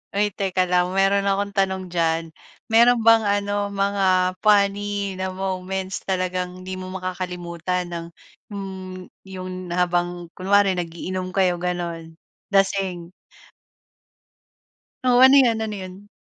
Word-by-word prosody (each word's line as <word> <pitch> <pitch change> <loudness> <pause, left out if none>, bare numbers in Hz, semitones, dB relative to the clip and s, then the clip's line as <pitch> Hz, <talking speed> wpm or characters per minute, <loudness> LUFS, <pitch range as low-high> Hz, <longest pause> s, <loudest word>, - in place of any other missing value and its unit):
Oy 205 0 +2
teka 185 -1 0
lang, 180 0 +2
meron 195 +1 +3
akong 200 +1 0
tanong 190 -2 -1
diyan. 165 -1 0 0.4
Mayro'n 235 0 +5
bang 225 -1 +6
ano, 205 0 0
mga 200 0 0 0.3
funny 200 -2 +1
na 190 0 -2
moments, 190 0 -3
talagang 185 -1 -2
hindi 185 0 -6
mo 185 - -7
makakalimutan 180 -1 -4
ng 170 -1 -5 0.4
hmm, 190 -2 -7 0.2
'yon 185 -1 -7
habang 175 -1 -1
kunwari 195 +1 +2
nag-iinom 180 +2 -4
kayo 180 -2 +2
gano'n, 170 -2 -4 0.4
lasing. 190 -3 +1 1.9
Oo. 250 0 +5
Ano 265 +1 +8
'yon, 235 -4 +4
ano 215 -1 -3
'yon? 190 +2 -10
185 Hz, 120 wpm, -23 LUFS, 180-200 Hz, 1.9 s, Ano